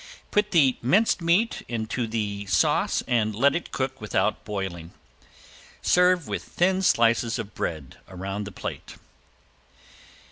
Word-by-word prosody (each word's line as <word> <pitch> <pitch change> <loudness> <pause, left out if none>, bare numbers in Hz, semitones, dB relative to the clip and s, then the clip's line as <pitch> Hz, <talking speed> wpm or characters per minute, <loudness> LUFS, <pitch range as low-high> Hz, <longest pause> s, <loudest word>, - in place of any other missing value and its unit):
Put 210 0 +2
the 145 -9 +4
minced 190 - +2
meat 180 +7 +2
into 115 +1 -3
the 105 -2 -3
sauce 90 -3 +2
and 110 -3 +1
let 140 +5 +3
it 170 - -4
cook 130 0 -3
without 105 0 0
boiling. 95 -5 -5 0.9
Serve 180 -3 +3
with - - -3
thin 185 +2 +1
slices 115 -7 +2
of 110 -3 -6
bread 75 -6 -5
around 95 +2 -5
the 100 - -7
plate. - - -7
115 Hz, 130 wpm, -25 LUFS, 100-170 Hz, 0.9 s, the